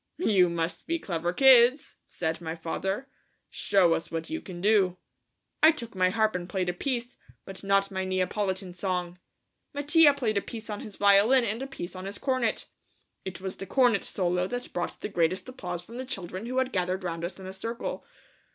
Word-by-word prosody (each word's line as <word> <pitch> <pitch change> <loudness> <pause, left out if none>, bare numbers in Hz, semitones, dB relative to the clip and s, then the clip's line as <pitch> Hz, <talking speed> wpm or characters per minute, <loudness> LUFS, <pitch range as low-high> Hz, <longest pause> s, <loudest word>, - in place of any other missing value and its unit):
"You 195 - +4
must 170 0 -3
be 335 0 0
clever 175 - -2
kids," 255 +4 +5
said 165 0 -3
my 160 -1 -4
father; 190 +9 -3 0.4
"show 190 -4 +3
us 165 - -3
what 165 - -5
you 325 0 -3
can 180 -2 -9
do." 195 -2 +3 0.6
I 315 - +9
took 240 -7 -6
my 185 -1 +3
harp 220 +2 +1
and 180 0 -4
played 185 -2 -1
a - - -1
piece, 245 +4 -3 0.3
but 195 0 -8
not 195 0 +2
my 190 -1 -2
Neapolitan 185 0 -1
song. 180 -1 -3 0.6
Mattia 295 +1 +5
played 220 -7 0
a - - -8
piece 225 0 -7
on 205 - -4
his 210 - -9
violin 205 +6 +5
and 225 +2 -2
a 270 - -4
piece 195 -9 -7
on 185 +1 -7
his 200 +1 -6
cornet. 255 -4 0 0.6
It 185 -1 -6
was 190 -1 -5
the 195 - -7
cornet 245 -6 +3
solo 180 -1 0
that 245 +4 -5
brought 175 - -3
the - - -2
greatest 185 0 0
applause 180 -9 -6
from 230 +4 -10
the 260 - -4
children 190 -3 -5
who 255 +1 -3
had 260 0 +1
gathered 185 +1 -1
round 170 -2 -4
us 175 +2 -5
in 190 - -9
a 190 - -7
circle. 230 +5 -5
195 Hz, 195 wpm, -28 LUFS, 180-235 Hz, 0.6 s, I